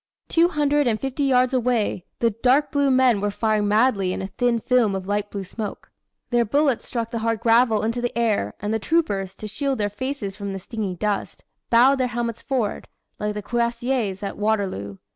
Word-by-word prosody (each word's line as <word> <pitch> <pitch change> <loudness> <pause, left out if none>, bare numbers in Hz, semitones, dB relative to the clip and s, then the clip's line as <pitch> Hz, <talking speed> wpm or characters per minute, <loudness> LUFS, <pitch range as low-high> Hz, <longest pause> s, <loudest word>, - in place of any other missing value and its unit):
"Two 335 +1 +4
hundred 295 -3 +1
and 220 -2 +1
fifty 270 +1 -2
yards 255 -1 +3
away, 240 -7 0
the 230 -1 +2
dark 255 +7 +2
blue 285 -1 +2
men 255 -5 +4
were 205 - 0
firing 215 0 0
madly 210 -3 +2
in - - -3
a 190 - -3
thin 235 +4 0
film 240 -4 +2
of 190 -1 -4
light 205 +1 -1
blue 200 -1 -5
smoke. 205 +3 -7 0.4
Their 240 0 +3
bullets 275 +2 +1
struck 230 -2 -3
the 230 - -2
hard 225 0 0
gravel 230 -1 +3
into 230 +2 -1
the 245 -1 -3
air, 215 - 0
and 210 +2 -2
the 225 - 0
troopers, 200 - 0
to 215 - -7
shield 270 +5 -2
their 205 -1 0
faces 230 -3 -4
from 200 -1 -5
the 195 - -4
stinging 200 -1 -4
dust, 205 +2 -3 0.3
bowed 260 +4 +5
their 255 - +2
helmets 235 -1 -3
forward, 250 -7 -2 0.3
like 210 0 -2
the 210 - -4
Cuirassiers 235 -3 -1
at 200 - -5
Waterloo. 195 - -1
230 Hz, 200 wpm, -23 LUFS, 205-250 Hz, 0.4 s, bowed